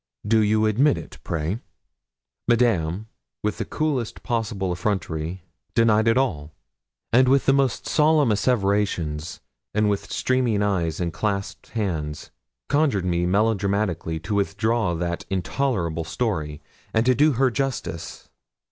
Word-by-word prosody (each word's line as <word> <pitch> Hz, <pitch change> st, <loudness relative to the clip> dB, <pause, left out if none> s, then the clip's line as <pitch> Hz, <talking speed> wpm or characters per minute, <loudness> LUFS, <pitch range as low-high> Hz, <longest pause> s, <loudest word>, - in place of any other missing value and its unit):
Do 110 Hz, +1 st, +4 dB
you 110 Hz, 0 st, +3 dB
admit 130 Hz, +7 st, +3 dB
it, -, -, -9 dB
pray?' 80 Hz, +6 st, -2 dB, 0.9 s
Madame, 110 Hz, -6 st, +2 dB, 0.4 s
with 105 Hz, -, -1 dB
the -, -, -1 dB
coolest 145 Hz, -7 st, -2 dB
possible 110 Hz, -5 st, -1 dB
effrontery, 90 Hz, -2 st, -2 dB, 0.3 s
denied 110 Hz, -1 st, +4 dB
it 115 Hz, +1 st, +4 dB
all; 80 Hz, -, -1 dB, 0.6 s
with 130 Hz, +3 st, +5 dB
the 135 Hz, -, +5 dB
most 135 Hz, -3 st, +1 dB
solemn 150 Hz, -5 st, +3 dB
asseverations, 100 Hz, -8 st, 0 dB, 0.3 s
and 105 Hz, -1 st, +3 dB
with 100 Hz, -, -3 dB
streaming 125 Hz, -5 st, +1 dB
eyes 85 Hz, -6 st, 0 dB
and 85 Hz, -2 st, -2 dB
clasped 100 Hz, 0 st, -3 dB
hands, 80 Hz, -9 st, -3 dB, 0.4 s
conjured 140 Hz, -, +2 dB
me 85 Hz, -1 st, +1 dB
melodramatically 100 Hz, -4 st, 0 dB
to 90 Hz, +5 st, -4 dB
withdraw 105 Hz, -1 st, +1 dB
that 85 Hz, +1 st, -3 dB
intolerable 95 Hz, -, -1 dB
story, 80 Hz, -7 st, -3 dB, 0.3 s
and 110 Hz, +1 st, +3 dB
to 130 Hz, -, +5 dB
do 150 Hz, +3 st, +4 dB
her 130 Hz, +1 st, +2 dB
justice. 115 Hz, -10 st, -4 dB
105 Hz, 125 wpm, -24 LUFS, 85-120 Hz, 0.9 s, with